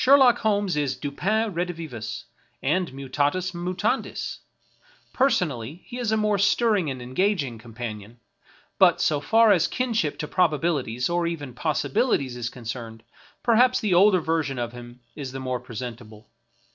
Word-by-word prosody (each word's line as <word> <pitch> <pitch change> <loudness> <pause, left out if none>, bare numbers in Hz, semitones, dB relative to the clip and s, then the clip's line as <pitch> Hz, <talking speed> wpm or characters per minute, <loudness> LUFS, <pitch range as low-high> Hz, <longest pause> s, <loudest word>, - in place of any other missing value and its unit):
Sherlock 265 -2 +6
Holmes 205 -5 +1
is 145 -3 0
Dupin 205 +9 -1
redivivus, 165 -10 -4 0.4
and 175 +5 +1
mutatus 145 +7 -1
mutandis; 175 +1 -2 0.7
personally 175 - 0
he 245 - -7
is 235 -3 -1
a 220 - +2
more 210 -2 +1
stirring 205 -4 +2
and 130 -2 -5
engaging 135 - 0
companion, 115 -1 -8 0.6
but - - +6
so 150 -2 +2
far 225 +8 +4
as 180 -4 +4
kinship 230 - -1
to 150 - -4
probabilities 150 -9 +1
or 170 0 0
even 145 -6 -5
possibilities 140 - 0
is 120 -1 -3
concerned, 115 -2 -7 0.4
perhaps 245 +2 +4
the 210 -6 0
older 185 0 +5
version 160 -4 -1
of 120 -1 -3
him 120 0 -11
is 135 -4 -6
the 135 - -5
more 130 -1 -2
presentable. 115 -2 -8
155 Hz, 140 wpm, -25 LUFS, 125-200 Hz, 0.7 s, Sherlock